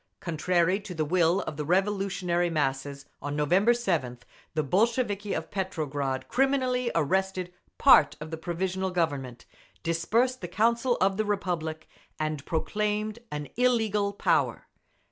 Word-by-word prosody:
Contrary 175 +3 +1
to 195 -3 -8
the 155 -1 0
will 175 +3 +2
of 150 - -6
the 150 - -2
revolutionary 185 0 +1
masses, 140 -2 -2 0.2
on 145 0 -3
November 180 +10 +3
7th 165 - -1 0.3
the 155 - +1
Bolsheviki 210 - +1
of 160 - -5
Petrograd 145 -8 -2
criminally 255 -2 +1
arrested 185 +2 0 0.2
part 150 - +6
of 155 +1 -8
the 160 - -4
Provisional 185 +3 -2
Government, 145 -9 -2 0.4
dispersed 225 +10 +1
the 175 - -4
Council 235 +6 +1
of 195 0 +2
the 215 - 0
Republic, 175 -6 -2 0.3
and 155 -2 -2
proclaimed 210 +5 -1
an 150 -1 -5
illegal 220 -5 +2
power. 200 - +1
180 Hz, 130 wpm, -27 LUFS, 155-210 Hz, 0.4 s, part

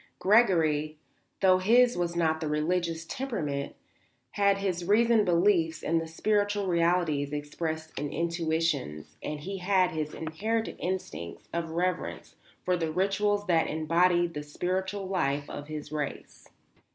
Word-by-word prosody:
Gregory, 160 -8 +3 0.4
though 185 -1 +5
his 240 +6 +4
was 175 -1 -1
not 160 -2 +1
the 155 - -2
religious 165 +2 -1
temperament, 160 - -3 0.6
had 200 -1 +3
his 185 -3 -2
reasoned 220 +3 +4
beliefs 170 -2 +2
in 165 0 +1
the 165 - -5
spiritual 205 +4 0
realities 170 -5 +1
expressed 160 +2 -4
in 145 0 -3
institutions 165 - -1
and 150 -1 -5
he 195 +4 -5
had 185 -1 +2
his 155 -2 -4
inherited 215 +9 -2
instincts 180 - -5
of 170 -1 -2
reverence 180 +3 -2 0.3
for 180 - +2
the 165 -2 -2
rituals 205 +3 +1
that 170 -4 +2
embodied 170 +2 +2
the 150 - -4
spiritual 185 +6 -3
life 145 -7 -1
of 145 0 -7
his 150 -1 -7
race. 150 -2 -5
170 Hz, 135 wpm, -28 LUFS, 155-190 Hz, 0.6 s, though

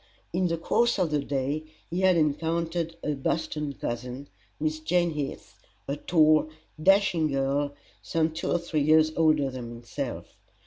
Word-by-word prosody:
In 180 +1 +2
the 165 -1 -1
course 235 +8 +2
of 180 -5 +1
the 150 -1 +1
day 140 +2 -1 0.3
he 175 +2 -1
had 185 -2 +5
encountered 165 +2 0
a 150 - 0
Boston 150 +1 -2
cousin, 125 +2 -5 0.3
Miss 155 +1 -1
Jane 170 +2 +1
Heath, 145 -3 -6 0.3
a 140 - -1
tall, 155 0 +3 0.3
dashing 195 -3 +4
girl, 140 +1 0 0.3
some 160 -1 0
two 160 - -3
or - - +3
three 170 -3 -2
years 155 +1 +5
older 155 -4 +3
than 125 -2 -6
himself. 120 -1 -5
155 Hz, 150 wpm, -27 LUFS, 140-165 Hz, 0.3 s, had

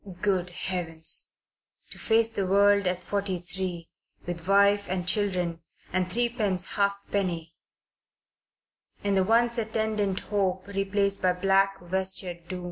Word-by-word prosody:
Good 185 -3 0
Heavens! 165 -2 -1 0.5
To - - -4
face 225 0 +3
the 200 -4 -2
world 200 0 +4
at 180 0 -1
forty 200 -2 -1
three, 175 -1 -4 0.3
with 175 0 -5
wife 200 +1 +4
and 180 -1 -2
children 180 -5 0 0.3
and 185 0 0
threepence 220 -5 0
halfpenny, 200 -4 -1 1.5
and 200 -1 +1
the 190 - +3
once 235 +3 +2
attendant 215 -3 -1
hope 190 -2 -1
replaced 200 0 -1
by 185 -1 +3
black 195 +1 +2
vestured 180 -1 -1
doom! 185 0 -5
195 Hz, 125 wpm, -27 LUFS, 180-200 Hz, 1.5 s, world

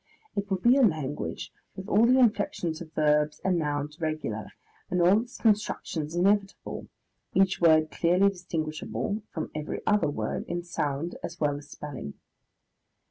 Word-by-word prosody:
It 200 0 -2
will 190 - +1
be 240 +8 +4
a - - +5
language 155 - -1 0.2
with 190 +1 -7
all 225 +2 +4
the 255 +2 +5
inflexions 205 -8 +1
of 160 -2 -9
verbs 150 -1 +2
and 185 -2 +2
nouns 150 +1 -3
regular 155 -9 -2 0.4
and 180 - 0
all 185 +5 +5
its 245 +1 -10
constructions 180 -7 0
inevitable, 195 +2 0 0.5
each 195 -1 +3
word 155 -2 +5
clearly 180 +4 +3
distinguishable 175 +2 -3
from 160 - -5
every 150 0 -4
other 210 -8 +3
word 110 -7 -3
in 175 0 -3
sound 160 -1 -3
as 170 0 -6
well 145 -2 +1
as 145 0 -10
spelling. 140 - -7
170 Hz, 150 wpm, -28 LUFS, 150-195 Hz, 0.5 s, a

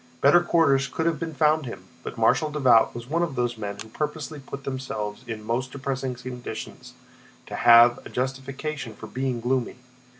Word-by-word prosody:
Better 145 +5 +6
quarters 160 -6 +3
could 160 +5 -3
have 165 -3 +1
been 165 -2 -4
found 155 -1 +3
him, 115 - -7 0.2
but - - -7
Marshal 155 - +3
Davout 130 -8 +4
was 120 0 -7
one 165 +5 0
of 165 -6 -1
those 120 -1 0
men 100 -2 -5
who 110 - -8
purposely 150 +2 -4
put 140 0 -8
themselves 125 -5 -4
in 110 -2 -5
most 120 +4 -2
depressing 135 -1 -3
conditions 125 -2 -8 0.5
to - - -10
have 120 +1 +6
a - - -10
justification 135 0 -4
for - - -9
being 130 -2 -2
gloomy. 125 +1 -1
130 Hz, 175 wpm, -25 LUFS, 120-150 Hz, 0.5 s, Better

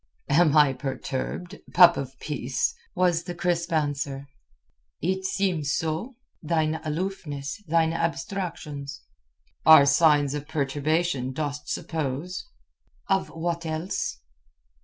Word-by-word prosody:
"Am 155 0 +4
I 145 -3 +6
perturbed, 135 +7 -4 0.2
pup 175 -2 +9
of 135 -1 -5
peace?" 150 - -1 0.2
was 175 -2 +2
the 175 -1 -5
crisp 170 0 -1
answer. 145 -3 -1 0.7
"It 190 +3 -1
seems 180 -8 0
so. 165 +11 -3 0.3
Thine 160 -1 0
aloofness, 155 -2 -4
thine 165 0 +2
abstractions...." 165 -4 -4 0.6
"Are 160 -3 +9
signs 145 -1 +4
of 145 0 -5
perturbation, 145 -1 0
dost 145 0 -4
suppose?" 160 - -3 0.6
"Of 195 -1 +1
what 170 +1 -3
else?" 160 - -3
160 Hz, 105 wpm, -26 LUFS, 145-175 Hz, 0.7 s, pup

